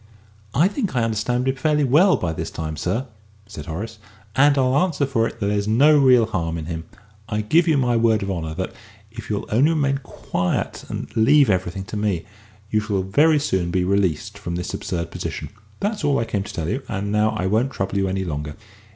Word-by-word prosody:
"I 155 +8 +5
think 205 - -3
I 120 - +2
understand 115 +3 0
him 130 - +2
fairly 150 +2 +1
well 155 +9 +5
by 80 -3 -2
this - - -4
time, 80 -1 -5
sir," 90 - -2 0.4
said 100 -8 -9
Horace, 105 +7 -5 0.4
"and 145 +1 +5
I'll 130 -1 +2
answer 150 -4 +1
for 115 -4 +1
it - - -9
that 100 - -1
there's 100 0 0
no 140 +8 +5
real 125 -4 +6
harm 85 -7 -2
in 80 - -5
him. 80 0 -5 0.4
I 105 0 -1
give 160 +11 +3
you 155 -3 +4
my 125 -3 +2
word 115 -3 +3
of 100 - -2
honour 80 -3 -4
that, - - -4 0.4
if - - -9
you'll - - -2
only 130 +8 +4
remain 140 -4 +1
quiet 90 -8 -3
and - - -6
leave 125 +2 +5
everything 95 0 -1
to 100 +2 -6
me, 100 -5 -1 0.5
you 110 - +3
shall 105 -3 -1
very 150 +12 +4
soon 95 -11 0
be 90 +1 +1
released 100 +1 0
from 85 -4 -4
this 90 0 -4
absurd 85 -5 -3
position. - - -5 0.3
That's 205 -2 -2
all 145 -1 +2
I 115 - 0
came 105 -3 -2
to 100 - -6
tell 80 -2 -4
you, 130 +10 -1
and 100 -1 -3
now 105 +1 +2
I 90 - -1
won't 110 +8 +1
trouble 95 -3 -2
you 95 - +1
any 95 0 -1
longer. 75 -2 -4
105 Hz, 215 wpm, -22 LUFS, 95-135 Hz, 0.5 s, real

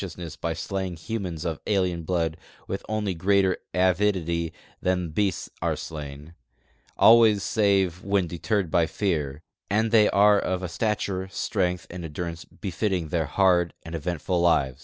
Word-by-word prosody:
mess 85 -3 -7
by 85 - -3
slaying 95 +2 -3
humans 90 -2 -4
of 80 -3 -2
alien 90 -4 +1
blood 80 -1 -1 0.3
with 95 - -4
only 105 -3 -1
greater 95 +1 +2 0.2
avidity 90 -2 +1 0.3
than 90 -2 0
beasts 95 +1 0
are - - +1
slain, 75 0 -8 0.6
always 110 -3 +6
save 95 -5 +2
when 100 -2 +1
dctemal 90 +1 -1
by 85 -2 +3
f(>ar; 75 -8 -2 0.3
and 110 +2 +1
they 110 -2 +6
are 105 0 +5
of 95 0 -2
a - - -1
stature, 95 0 -2
strength, 90 -2 -1
and 90 0 -7
endurance 85 +1 -5
befitting 95 -4 -3
their 80 -1 0
hard 90 -2 +2
and 80 - -9
eventful 85 +2 -1
lives. 70 -7 +2
90 Hz, 145 wpm, -25 LUFS, 85-100 Hz, 0.6 s, always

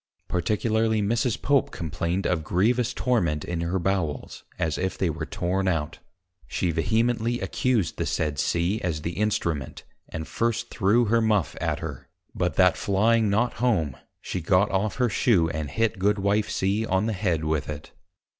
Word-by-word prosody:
Particularly 110 +4 +1
Mrs. 115 +3 0
Pope 140 -1 +2
complained 85 +3 -3
of 85 -3 0
grievous 115 +9 +1
Torment 85 - 0
in 85 -1 -3
her 85 +3 -1
Bowels, 85 -6 -2
as 80 -3 -1
if 95 +1 -2
they 90 -4 +1
were 80 0 -5
torn 95 0 -1
out. 80 -3 -1 0.5
She 90 - -1
vehemently 115 +7 +1
accused 120 -10 0
the - - -1
said 75 -3 -1
C. 90 +6 0
as 80 -4 -2
the 85 - -2
Instrument, 85 -8 -2 0.3
and 80 0 -5
first 115 0 -1
threw 115 +2 +3
her 115 +2 +3
Muff 105 -10 +1
at - - -1
her; - - -6 0.3
but - - -1
that - - +4
flying 110 +2 +2
not 110 +4 +1
home, 85 - +1 0.2
she 90 - -4
got 90 +4 +3
off 100 +1 0
her 125 0 +2
shoe, 100 -6 +2
and 80 -2 -3
hit 115 +6 0
Goodwife 105 +2 +1
C. 100 +2 0
on 95 -1 +1
the 110 - 0
Head 90 -6 0
with 75 -2 -1
it. 75 -1 -7
95 Hz, 165 wpm, -25 LUFS, 85-110 Hz, 0.5 s, that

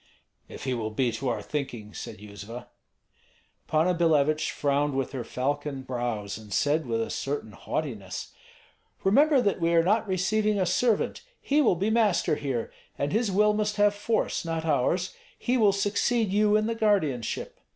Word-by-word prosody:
"If - - -9
he 130 - -1
will 110 -3 -2
be 120 +3 0
to 125 +3 -3
our 120 - -2
thinking," 125 -8 -5
said - - -7
Yuzva. 105 +4 -9 1.0
Panna 160 +4 +2
Billevich 155 -3 +2
frowned 145 0 0
with 135 -1 -1
her 130 -3 -4
falcon 140 +3 -3
brows, 120 -5 -3
and 105 -2 -13
said 150 +7 +1
with 115 -1 0
a - - -5
certain 140 -5 -3
haughtiness: 100 - -5 0.7
"Remember 275 +8 +5
that 200 -3 0
we 170 0 +2
are 165 - +5
not 210 +5 +2
receiving 205 +3 +1
a 185 - +2
servant. 225 +5 +1 0.2
He 295 +2 +2
will 230 -10 +4
be 200 +6 0
master 215 -8 +2
here; 135 -6 -3 0.3
and 140 +1 -1
his 225 0 +1
will 210 +2 +4
must 210 0 -1
have 205 0 +4
force, 210 +2 -1
not 165 -1 -3
ours. 165 +5 +1 0.2
He 250 - 0
will 215 -5 +5
succeed 205 +2 +1
you 210 +1 +3
in 215 0 +3
the 230 - 0
guardianship." 190 - 0
160 Hz, 170 wpm, -27 LUFS, 130-210 Hz, 1.0 s, Remember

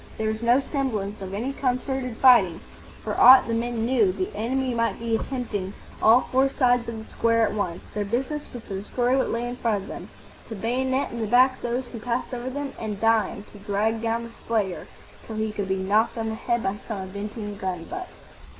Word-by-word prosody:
There 220 0 0
was 220 +1 -3
no 240 +2 +4
semblance 225 -8 -2
of 190 -1 -6
any 235 +8 -3
concerted 255 -2 -2
fighting. 220 -10 +6 0.4
For - - -3
aught 260 +1 +9
the 230 - -1
men 230 0 -1
knew, 235 -6 +3
the 185 0 -4
enemy 255 +4 -1
might 230 0 0
be 230 -1 -1
attempting 220 -6 -3 0.3
all 230 +3 +7
four 265 +1 +4
sides 245 -3 +2
of 230 - -5
the 220 - -10
square 230 -1 +3
at - - -2
once. 185 -5 -3
Their 210 - -1
business 260 +8 -2
was 240 -2 -8
to 195 -3 -5
destroy 245 +4 0
what 270 - +1
lay 235 +1 -2
in 245 0 -5
front 220 -5 0
of - - -11
them, - - -8 0.4
to 225 - -5
bayonet 260 +5 -1
in 235 - -5
the 220 - -1
back 255 +3 +4
those 245 +1 -2
who 230 - -7
passed 245 +3 -3
over 245 +1 -3
them, 280 +1 -4
and, 210 -3 -4
dying, 225 -1 +2
to 205 - -13
drag 210 +2 0
down 230 0 -1
the 235 - -9
slayer 215 -6 -2 0.4
till 220 - -6
he 220 0 -1
could 205 -2 -3
be 190 - +1
knocked 205 +5 +1
on 225 -1 -2
the - - -3
head 235 +1 -1
by 195 +1 -1
some 210 -4 -4
avenging 205 +2 -6
gun 185 -3 -3
butt. 365 - -6
230 Hz, 215 wpm, -25 LUFS, 210-250 Hz, 0.4 s, aught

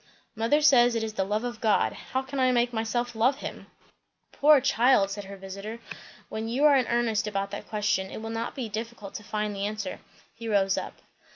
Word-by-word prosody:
"Mother 230 +7 +2
says, 245 -5 +6
it 225 - 0
is 220 -1 -4
the 195 - 0
love 210 +3 -1
of 240 -2 -5
God. 220 -2 +2
How 260 +1 -4
can 265 +1 -5
I 255 -1 +4
make 240 0 +1
myself 235 +2 -1
love 235 +5 +2
him?" - - -7 0.6
"Poor 295 0 +6
child!" 245 -6 +3
said 205 0 -5
her 200 0 -9
visiter. 195 +4 -7 0.5
"When 220 +1 -4
you 255 +5 0
are 295 -2 +7
in 255 -3 +2
earnest 230 -3 +1
about 200 -1 -2
that 205 - -7
question 210 -3 0
it - - -7
will 225 +1 -6
not 230 +1 -4
be 255 -5 -3
difficult 220 -1 -6
to 210 - -7
find 210 0 -3
the 200 +1 -1
answer." 210 -3 -5 0.3
He 230 - -8
rose 195 -2 +2
up. - - -4
225 Hz, 210 wpm, -27 LUFS, 205-245 Hz, 0.6 s, are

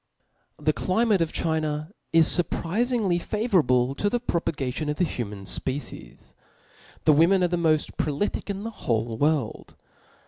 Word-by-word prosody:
The - - +1
climate 205 0 +1
of 165 - 0
China 155 0 -2 0.2
is 165 -1 +5
furprizingly 185 +3 +1
favourable 155 - +1
to 205 +9 0
the 245 - 0
propagation 150 - -2
of 150 - -2
the - - +2
human 105 - -4
fpecies. 130 - -4 0.7
The 155 - +6
women 175 +5 +4
are - - +4
the 175 - 0
moft 160 -3 +1
prolific 155 +8 -2
in 200 0 -3
the 230 - -4
whole 115 - -2
world. 145 -2 -1
160 Hz, 140 wpm, -25 LUFS, 140-195 Hz, 0.7 s, The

